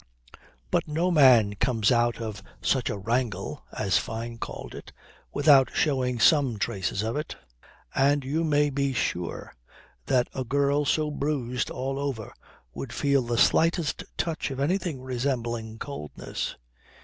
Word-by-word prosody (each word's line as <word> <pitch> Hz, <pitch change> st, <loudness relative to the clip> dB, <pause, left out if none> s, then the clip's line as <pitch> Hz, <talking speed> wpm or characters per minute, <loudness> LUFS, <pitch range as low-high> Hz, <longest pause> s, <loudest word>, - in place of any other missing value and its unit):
But -, -, +1 dB
no 165 Hz, +4 st, 0 dB
man 125 Hz, -10 st, +6 dB
comes 110 Hz, +1 st, +1 dB
out 120 Hz, -1 st, +2 dB
of 110 Hz, -4 st, -5 dB, 0.2 s
such -, -, +1 dB
a -, -, -2 dB
'wrangle' 115 Hz, +3 st, -2 dB
(as 95 Hz, -2 st, +1 dB
Fyne 115 Hz, +1 st, -5 dB
called -, -, -7 dB
it) -, -, -10 dB, 0.4 s
without 140 Hz, -3 st, +5 dB
showing 130 Hz, -5 st, +1 dB
some 135 Hz, -3 st, +4 dB
traces 100 Hz, 0 st, -2 dB
of 115 Hz, +1 st, -2 dB
it. 150 Hz, +1 st, -4 dB, 0.6 s
And 140 Hz, +1 st, +3 dB
you 155 Hz, +5 st, 0 dB
may 145 Hz, -2 st, +2 dB
be 140 Hz, 0 st, 0 dB
sure 90 Hz, -8 st, -3 dB, 0.5 s
that 125 Hz, -2 st, +2 dB
a 130 Hz, -, -2 dB
girl 140 Hz, +3 st, +1 dB
so 150 Hz, +2 st, +1 dB
bruised 135 Hz, -4 st, -2 dB
all 135 Hz, +1 st, -3 dB
over 135 Hz, -7 st, -4 dB, 0.4 s
would 115 Hz, -, -6 dB
feel 140 Hz, +1 st, +2 dB
the 120 Hz, -1 st, -2 dB
slightest 165 Hz, +3 st, +2 dB
touch 165 Hz, -2 st, -2 dB
of 135 Hz, -1 st, -5 dB
anything 155 Hz, -2 st, -1 dB
resembling 120 Hz, -3 st, -2 dB
coldness. 115 Hz, -, -5 dB
130 Hz, 140 wpm, -26 LUFS, 115-145 Hz, 0.6 s, man